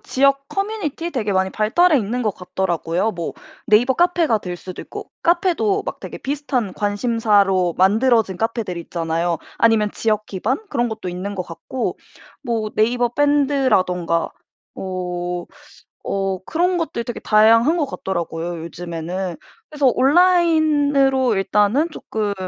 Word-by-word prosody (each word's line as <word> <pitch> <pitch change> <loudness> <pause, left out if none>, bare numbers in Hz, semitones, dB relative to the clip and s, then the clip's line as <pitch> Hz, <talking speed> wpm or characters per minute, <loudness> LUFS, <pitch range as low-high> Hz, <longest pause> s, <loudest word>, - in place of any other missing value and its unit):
지역 275 -7 +1
커뮤니티 390 -5 -3
되게 215 -6 -1
많이 190 0 +2
발달해 300 - +3
있는 240 +4 -2
것 215 -3 0
같더라고요. 180 +2 -1
뭐 170 -2 -5 0.3
네이버 240 +3 +4
카페가 345 -9 +2
될 180 -3 -6
수도 185 +1 -8
있고 - - -9
카페도 375 +4 +1
막 - - -5
되게 - - -8
비슷한 265 -7 -2
관심사로 205 -4 +2
만들어진 215 0 +3
카페들 225 -4 -2
있잖아요. 170 0 -2 0.2
아니면 225 -2 +3
지역 215 -1 -1
기반 215 +8 -2
그런 240 -7 0
것도 220 -5 -5
있는 185 +3 -5
것 185 - -1
같고 170 +10 -4 0.4
뭐 225 -3 -2
네이버 240 +2 +2
밴드라든가 260 - +1 0.5
어, 180 -1 -4 0.6
어 195 -1 -1
그런 355 +3 +1
것들 315 -8 -3
되게 240 - -5
다양한 230 +8 +4
것 305 -4 0
같더라고요 170 -6 -4
요즘에는. 170 +1 -5 0.3
그래서 295 -3 0
온라인으로 290 - +3
일단은 210 - +2
쪼끔 210 -8 -3
220 Hz, 310 characters per minute, -20 LUFS, 185-275 Hz, 0.6 s, 네이버